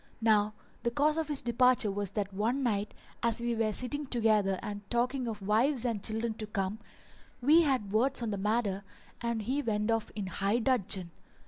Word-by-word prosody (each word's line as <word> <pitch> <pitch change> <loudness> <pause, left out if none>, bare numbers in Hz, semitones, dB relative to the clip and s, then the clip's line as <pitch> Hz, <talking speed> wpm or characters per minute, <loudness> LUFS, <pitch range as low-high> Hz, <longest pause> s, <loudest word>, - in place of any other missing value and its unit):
Now 215 -2 +3 0.3
the 235 - 0
cause 300 +5 +2
of 320 - -2
his 295 -3 -1
departure 240 -2 +3
was 200 0 -1
that 200 -1 -1
one 230 +8 0
night, 210 -4 -1 0.3
as 235 0 +1
we 235 0 -1
were 225 -1 0
sitting 275 +6 -1
together 215 -6 +2
and 205 -1 -5
talking 245 +1 0
of 210 -3 -5
wives 235 +6 +2
and 225 -5 -1
children 225 +1 -1
to 215 - -4
come, 200 0 -2 0.6
we 300 +7 +6
had 260 -10 0
words 250 +3 +2
on 225 - -2
the 200 - -2
matter 205 -1 0 0.4
and 235 -2 -2
he 265 +7 0
went 210 -3 0
off 225 -1 -1
in 205 -2 -3
high 200 +3 0
dudgeon. 205 -8 +1
225 Hz, 190 wpm, -31 LUFS, 205-250 Hz, 0.6 s, we